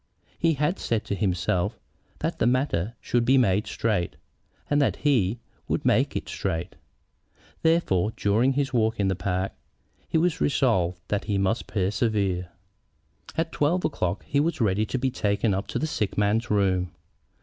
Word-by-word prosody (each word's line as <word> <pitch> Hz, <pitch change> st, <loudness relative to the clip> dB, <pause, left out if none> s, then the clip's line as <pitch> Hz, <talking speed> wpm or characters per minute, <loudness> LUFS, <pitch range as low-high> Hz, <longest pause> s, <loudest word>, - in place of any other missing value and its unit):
He 165 Hz, -1 st, +3 dB
had 150 Hz, +6 st, 0 dB
said 115 Hz, -2 st, -1 dB
to -, -, -2 dB
himself 90 Hz, -3 st, 0 dB, 0.4 s
that -, -, -2 dB
the 115 Hz, -, +3 dB
matter 120 Hz, -, 0 dB
should 120 Hz, -1 st, +1 dB
be 130 Hz, +3 st, +4 dB
made 105 Hz, -4 st, +2 dB
straight, 105 Hz, -7 st, -1 dB, 0.5 s
and 145 Hz, 0 st, +2 dB
that 140 Hz, -, +2 dB
he 120 Hz, -8 st, +2 dB, 0.3 s
would -, -, -1 dB
make -, -, +2 dB
it -, -, -3 dB
straight. 80 Hz, -1 st, -3 dB, 0.9 s
Therefore, 115 Hz, -, +2 dB
during 115 Hz, +6 st, +2 dB
his 135 Hz, 0 st, -1 dB
walk 110 Hz, -2 st, +1 dB
in 100 Hz, -1 st, +2 dB
the 95 Hz, -, 0 dB
park, 95 Hz, +1 st, -1 dB, 0.6 s
he -, -, +2 dB
resolved 125 Hz, -, +1 dB
that 105 Hz, -, -1 dB
he 100 Hz, -, 0 dB
must 100 Hz, +4 st, 0 dB
persevere. 100 Hz, -3 st, 0 dB, 0.9 s
At 165 Hz, 0 st, 0 dB
twelve 170 Hz, +5 st, +1 dB
o'clock 90 Hz, -, -2 dB
he 140 Hz, -, +1 dB
was 165 Hz, +2 st, 0 dB
ready 105 Hz, -1 st, +1 dB
to -, -, -2 dB
be 130 Hz, +1 st, 0 dB
taken 105 Hz, -2 st, +1 dB
up 95 Hz, +2 st, -2 dB
to -, -, -3 dB
the -, -, 0 dB
sick 110 Hz, -10 st, -2 dB
man's 105 Hz, +3 st, +1 dB
room. 95 Hz, -3 st, +2 dB
110 Hz, 160 wpm, -26 LUFS, 95-135 Hz, 0.9 s, be